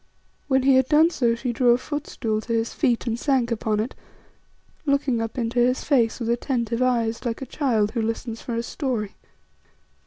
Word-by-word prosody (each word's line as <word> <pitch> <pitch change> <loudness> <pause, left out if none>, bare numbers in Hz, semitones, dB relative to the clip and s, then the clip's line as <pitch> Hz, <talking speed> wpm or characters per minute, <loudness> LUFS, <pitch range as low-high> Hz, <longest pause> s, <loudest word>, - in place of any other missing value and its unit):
When 265 -2 +2
he 270 -1 +5
had 260 -1 +2
done 315 +2 +5
so 235 -7 +1
she 240 +1 -3
drew 245 +1 +2
a - - +2
footstool 250 -6 -3
to 230 - -4
his 230 0 0
feet 245 -6 +1
and 230 -1 -2
sank 260 -4 +1
upon 215 -2 0
it, 225 +4 -2 0.9
looking 280 -5 +1
up 225 +1 -4
into 235 0 -1
his 250 +2 +2
face 240 -6 +2
with 230 -2 -3
attentive 235 -1 -1
eyes, 230 -3 +1
like 235 -2 -2
a 270 - -5
child 230 -6 0
who 230 - -1
listens 225 +1 -3
for 235 - -4
a 230 - -1
story. 235 -6 -3
240 Hz, 190 wpm, -24 LUFS, 230-265 Hz, 0.9 s, he